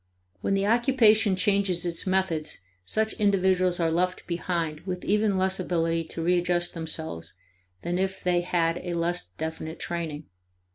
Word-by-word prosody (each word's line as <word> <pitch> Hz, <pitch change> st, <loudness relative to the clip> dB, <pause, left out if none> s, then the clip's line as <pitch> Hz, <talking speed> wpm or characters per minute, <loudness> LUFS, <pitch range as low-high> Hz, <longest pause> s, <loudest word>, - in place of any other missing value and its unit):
When 195 Hz, -, 0 dB
the 195 Hz, 0 st, +1 dB
occupation 225 Hz, -3 st, +4 dB
changes 185 Hz, -2 st, +1 dB
its 170 Hz, +2 st, -2 dB
methods, 180 Hz, -, -1 dB, 0.2 s
such 220 Hz, -, -1 dB
individuals 185 Hz, -3 st, +2 dB
are 165 Hz, -1 st, +2 dB
left 180 Hz, +2 st, 0 dB
behind 170 Hz, -3 st, -2 dB
with 180 Hz, +1 st, -5 dB
even 210 Hz, -1 st, +2 dB
less 190 Hz, 0 st, 0 dB
ability 165 Hz, -2 st, 0 dB
to 165 Hz, +1 st, -5 dB
readjust 175 Hz, 0 st, +1 dB
themselves 155 Hz, -, -5 dB, 0.5 s
than 175 Hz, +1 st, -1 dB
if 190 Hz, 0 st, -2 dB
they 180 Hz, -1 st, +2 dB
had 175 Hz, -1 st, 0 dB
a 175 Hz, -1 st, -4 dB
less 170 Hz, -, -1 dB
definite 160 Hz, 0 st, -4 dB
training. 165 Hz, -3 st, -4 dB
175 Hz, 145 wpm, -27 LUFS, 165-190 Hz, 0.5 s, occupation